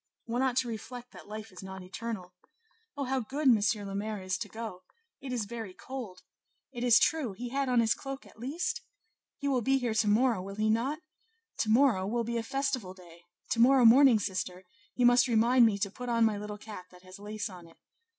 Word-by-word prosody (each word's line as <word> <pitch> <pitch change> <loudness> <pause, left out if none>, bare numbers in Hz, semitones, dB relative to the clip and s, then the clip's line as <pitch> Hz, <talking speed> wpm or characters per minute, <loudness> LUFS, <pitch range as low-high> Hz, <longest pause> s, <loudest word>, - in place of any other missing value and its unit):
One 235 +2 -1
ought 260 -2 +1
to 260 -2 +2
reflect 240 +2 -7
that - - -13
life 215 +1 -7
is 185 - -11
not 190 -1 -8
eternal. 185 -1 -6 0.6
Oh, 280 - -1
how 265 0 0
good 275 +5 -2
M. 235 -4 +6 0.3
le 195 - -6
Maire 210 +1 -3
is 185 0 -1
to 210 - -5
go! 220 -4 -7 0.4
it 270 -2 -6
is 240 -4 -1
very 220 -3 -7
cold! 240 -9 -8 0.5
it 240 -2 -5
is 240 -2 +6
true; 285 -5 +1
he 240 +5 -6
had 275 +1 -1
on 245 -2 +4
his 225 -1 +3
cloak, 270 0 -7
at - - -18
least? 290 +10 -2 0.6
he 280 - -3
will 260 -3 +2
be 270 +4 +2
here 245 -4 -1
to 220 -1 +2
morrow, 225 0 +3
will 195 +1 -7
he 215 +1 +1
not? 250 +7 0 0.6
to 220 - 0
morrow 225 -5 +4
will 235 +3 0
be 235 +1 -2
a - - 0
festival 250 -6 -2
day; 170 -2 -16 0.3
to 230 - +1
morrow 255 +1 +6
morning, 255 +1 +8
sister, 185 -2 -3 0.3
you 250 - +2
must 245 +1 +6
remind 235 +1 +5
me 205 -3 0
to 200 0 -2
put 250 +3 -7
on 230 -1 +3
my 220 -1 +2
little 210 0 -6
cap 210 -3 -9
that 180 0 -18
has 185 +1 -12
lace 210 0 -4
on 180 -3 -11
it. 165 - -20
225 Hz, 220 wpm, -30 LUFS, 200-250 Hz, 0.6 s, morning